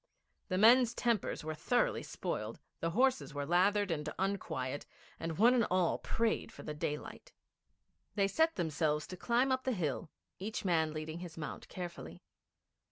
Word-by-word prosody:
The 185 - -1
men's 235 +3 +6
tempers 235 -9 0
were 155 0 -3
thoroughly 245 +10 +1
spoiled, - - -4 0.2
the 165 - 0
horses 255 - +2
were 145 0 -2
lathered 190 +4 +3
and 155 -1 -2
unquiet, 145 -9 -2 0.3
and 165 -1 -3
one 235 +5 +6
and 240 -3 +3
all 180 -2 +2
prayed 230 -1 0
for - - -11
the 150 - -4
daylight. 150 - -5 0.8
They 200 -2 +3
set 320 +11 +2
themselves 155 -3 0
to 185 - -7
climb 240 +7 +2
up 260 0 +1
the 260 - 0
hill, 160 - -2 0.3
each 205 +2 -4
man 160 -3 +2
leading 155 +1 -5
his 175 -2 -8
mount 150 - -6
carefully. 175 -2 -7
185 Hz, 160 wpm, -34 LUFS, 155-230 Hz, 0.8 s, men's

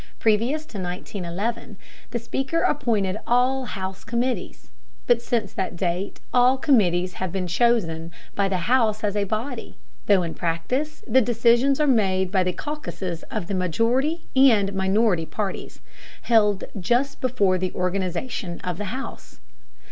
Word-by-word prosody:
Previous 235 +8 +1
to 215 -9 -8
1911 190 +4 -4 0.3
the 235 - -2
Speaker 270 +7 -2
appointed 215 -8 +1
all 255 +2 +2
House 190 -4 -5
committees, 245 +2 -3 0.3
but 240 -1 +3
since 230 -4 -1
that 185 -1 -3
date 180 +2 -2
all 250 +1 +5
committees 185 - +2
have 185 -2 -1
been 190 0 -2
chosen 175 -5 +1 0.2
by 200 -1 +1
the 185 -3 -1
House 225 -3 +2
as 205 -1 0
a 205 -1 +1
body, 225 +5 -4 0.3
though 195 -3 +5
in 165 -1 -4
practice 250 - -2
the 260 +2 +4
decisions 240 +4 +3
are 300 - +3
made 190 -8 +2
by 190 -2 +3
the 180 - 0
caucuses 190 - -5
of - - -3
the 200 - -4
majority 235 - +1
and 225 -7 +5
minority 190 -3 +2
parties, 205 -3 -5 0.4
held 210 -4 +3 0.2
just 245 +9 0
before 205 -8 +2
the 185 0 -1
organization 185 +1 -2
of 180 0 -4
the 210 - -3
House. 255 +7 -7
210 Hz, 145 wpm, -24 LUFS, 185-245 Hz, 0.4 s, all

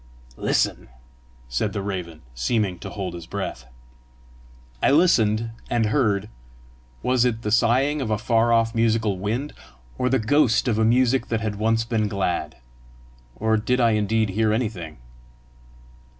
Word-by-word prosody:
"Listen!" - - 0 0.6
said 80 - -2
the 100 - -3
raven, 90 -6 -5
seeming 95 - -1
to - - -7
hold 95 -4 -5
his 85 -1 -9
breath. - - -5 1.1
I - - +3
listened, 115 -8 +3 0.2
and 120 -2 +1
heard 105 -4 +1 0.8
was 125 -1 +2
it 115 -2 -1
the 105 - -2
sighing 130 +6 +2
of 120 - -3
a 110 - +1
far 115 0 +2
off 115 -1 +2
musical 110 -4 +1
wind 115 +9 -3 0.5
or 125 - +1
the 135 - +3
ghost 120 0 +2
of 110 -3 +1
a - - +3
music 125 +2 +2
that 115 -1 -1
had 105 -2 -3
once 115 +1 +1
been 110 -2 0
glad? 90 -6 -2 0.8
Or 110 0 +1
did 125 +4 0
I 120 -2 +4
indeed 110 0 +1
hear 110 +3 +1
anything? 105 -9 -3
110 Hz, 150 wpm, -23 LUFS, 100-120 Hz, 1.1 s, I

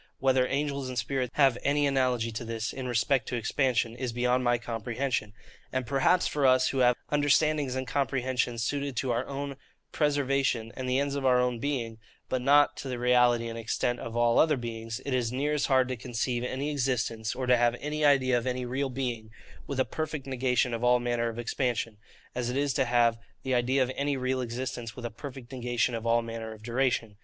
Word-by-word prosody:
Whether 130 -1 +2
angels 140 -1 -2
and 125 - -5
spirits 125 +1 -1
have 135 -4 +4
any 145 +1 +2
analogy 125 -4 +1
to 110 +2 -5
this, 115 -1 -3
in 130 -1 -5
respect 125 +1 +1
to - - -2
expansion, 120 -1 0
is 125 0 -3
beyond 125 +2 +1
my 120 -1 +3
comprehension: 120 0 -3 0.4
and 130 -1 -1
perhaps 140 +8 +2
for 145 -2 +2
us, 130 0 +4
who 135 - -1
have 125 -1 +5 0.2
understandings 145 -1 +2
and 130 0 -2
comprehensions 125 -3 -1
suited 140 +2 -2
to 125 +1 -1
our 120 +1 -1
own 140 0 -5 0.3
preservation, 140 -6 +1
and 130 -1 -4
the 130 - +2
ends 140 0 0
of 140 -1 -3
our 125 -1 +4
own 125 -1 0
being, 115 -5 -3 0.3
but 130 - 0
not 145 +3 +5
to - - -6
the 125 -2 -3
reality 125 -1 +3
and 115 0 -5
extent 120 +2 -1
of 115 0 -5
all 120 0 +4
other 155 -3 +4
beings, 115 -1 -5
it 140 - -2
is 120 -2 0
near 140 +4 0
as 150 - +1
hard 130 -2 +3
to 130 - -1
conceive 120 +1 -2
any 135 +4 -2
existence, 120 -5 -1
or 130 - -3
to 125 0 +5
have 120 0 +2
an 150 +3 -3
idea 135 -3 +4
of 120 +1 -1
any 125 0 -2
real 135 +3 -2
being, 120 -4 -4 0.4
with 140 -2 -3
a 130 - +3
perfect 155 +2 -4
negation 125 -2 0
of 115 +1 -3
all 125 0 +5
manner 120 -1 0
of 115 - -7
expansion, 120 -2 -2 0.4
as 120 -1 -2
it 125 - -2
is 140 -1 +1
to - - +1
have 120 -1 +3 0.2
the 130 - -1
idea 130 +2 +2
of 130 - -3
any 140 0 0
real 130 0 -1
existence 120 -1 -4
with 125 - -7
a 120 - -3
perfect 130 +1 -9
negation 120 -1 -1
of 115 0 -3
all 115 0 +3
manner 115 -1 -6
of 110 0 -15
duration. 120 -3 0
125 Hz, 210 wpm, -28 LUFS, 120-135 Hz, 0.4 s, have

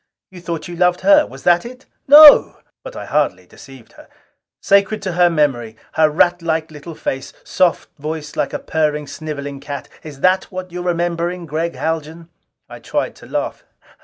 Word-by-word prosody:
You 180 -2 -12
thought 170 -2 -5
you 175 - -8
loved 180 0 +1
her! 300 0 +5
Was - - -13
that 175 0 +3
it?" 255 +2 -11 0.2
"No!" 295 +1 +8 0.2
But - - -10
I - - -7
hardly 95 -12 -1
deceived 130 +4 -16
her. - - -17 0.5
"Sacred 200 +2 +2
to 190 - -2
her 175 0 +3
memory! 135 -9 -1 0.2
Her 155 -1 +3
ratlike 165 0 0
little 155 +2 -10
face, 135 -2 -5
soft 180 -2 0
voice 150 0 -6
like - - -1
a - - -3
purring, 150 -2 -2
sniveling 145 -2 -7
cat! 140 0 -7
Is 145 -3 -11
that 185 +1 +2
what 185 -1 -8
you're 180 +1 -6
remembering, 175 0 -2
Gregg 165 +2 -3
Haljan?" 160 +1 -4 0.4
I - - -11
tried - - -3
to - - -15
laugh. - - -4
165 Hz, 170 wpm, -18 LUFS, 150-180 Hz, 0.5 s, No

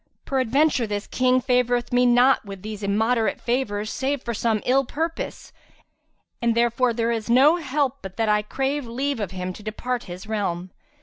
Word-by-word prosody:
Peradventure, 265 0 +2
this 205 -1 -3
King 255 0 +2
favoureth 245 -1 +1
me 250 0 +4
not 245 +2 +4
with 195 -2 -9
these 215 -1 -6
immoderate 220 +3 +1
favours 215 -4 -1
save 275 +1 -2
for 235 - -3
some 225 0 0
ill 270 +2 +3
purpose 320 +6 -4 0.9
and, 235 -1 +2
therefore, 240 +1 +2
there 230 0 0
is 225 -1 -3
no 275 +8 +6
help 280 -3 -1
but 190 -1 -9
that 225 -1 +1
I 210 0 +3
crave 270 +5 -2
leave 265 +3 -2
of 205 -4 -2
him 185 -1 -5
to 210 - -11
depart 240 +3 -3
his 180 +1 -8
realm." 190 -5 -3
235 Hz, 175 wpm, -24 LUFS, 215-260 Hz, 0.9 s, no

